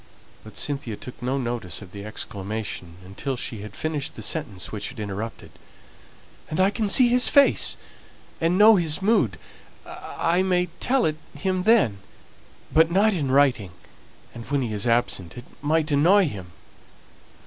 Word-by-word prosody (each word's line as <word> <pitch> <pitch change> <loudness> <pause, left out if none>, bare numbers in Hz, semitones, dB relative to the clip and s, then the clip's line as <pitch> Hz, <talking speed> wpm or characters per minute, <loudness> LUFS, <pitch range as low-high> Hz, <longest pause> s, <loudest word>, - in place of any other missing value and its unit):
But 110 - -12
Cynthia 140 -6 -2
took 125 +3 -11
no 130 +2 -1
notice 120 -8 -4
of 90 - -14
the 100 0 -9
exclamation 105 -4 -5
until 115 +8 -4
she 115 -3 -5
had 105 0 -10
finished 155 -3 -4
the - - -7
sentence 125 - -3
which 105 +2 -5
it 130 - -12
interrupted. 105 +2 -6 0.5
" - - -26
and 155 - -3
I 190 +2 +4
can 215 -1 -2
see 245 +3 +7
his 250 +1 +5
face 280 -1 +4 0.6
and 170 +2 +2
know 215 +1 +7
his 160 -4 +1
mood, 180 - +2 0.5
I 170 +2 -2
may 180 -2 +1
tell 260 -1 +2
it 155 -1 -1 0.2
him 185 -1 -1
then; 125 - +3 0.7
but 160 +1 +5
not 205 +5 +3
in 150 -7 -2
writing, 130 -9 +2 0.6
and 120 - -9
when 140 -2 0
he 115 -3 -4
is 105 +3 -2
absent; 115 -5 0
it 120 - -9 0.2
might 155 +1 0
annoy 180 +8 +4
him." 95 -9 -8
140 Hz, 160 wpm, -24 LUFS, 110-180 Hz, 0.7 s, see